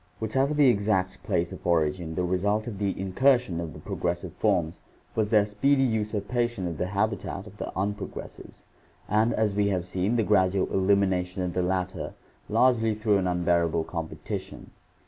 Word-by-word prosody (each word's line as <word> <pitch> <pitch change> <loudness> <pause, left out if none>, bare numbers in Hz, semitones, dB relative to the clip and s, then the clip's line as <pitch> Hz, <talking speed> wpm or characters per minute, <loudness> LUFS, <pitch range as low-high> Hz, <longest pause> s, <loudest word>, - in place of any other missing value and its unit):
Whatever 135 +7 0
the 145 -1 +5
exact 100 -4 +1
place 85 0 -1
of - - -7
origin, 80 0 +1
the 90 - 0
result 100 +4 0
of 105 -5 -6
the 100 -3 -1
incursion 95 -1 +2
of 80 -2 -6
the - - -10
progressive 85 0 -3
forms 90 -6 0 0.3
was 110 -2 +1
their 105 -1 +4
speedy 135 +7 +2
usurpation 110 -2 -1
of 85 -3 -5
the 90 - 0
habitat 100 0 -2
of 105 -1 -13
the - - -5
unprogressives 100 +2 -5 0.4
and, 110 +3 +2
as 110 -2 +1
we 100 0 +2
have 90 -3 0
seen, 95 +5 -1
the 115 - +2
gradual 95 -2 +3
elimination 95 -2 +1
of 90 -1 -2
the 90 - 0
latter, 90 0 -2 0.3
largely 115 -4 +3
through 105 -2 +2
an 95 - 0
unbearable 85 -2 +1
competition. 80 -1 -6
100 Hz, 165 wpm, -27 LUFS, 90-110 Hz, 0.4 s, the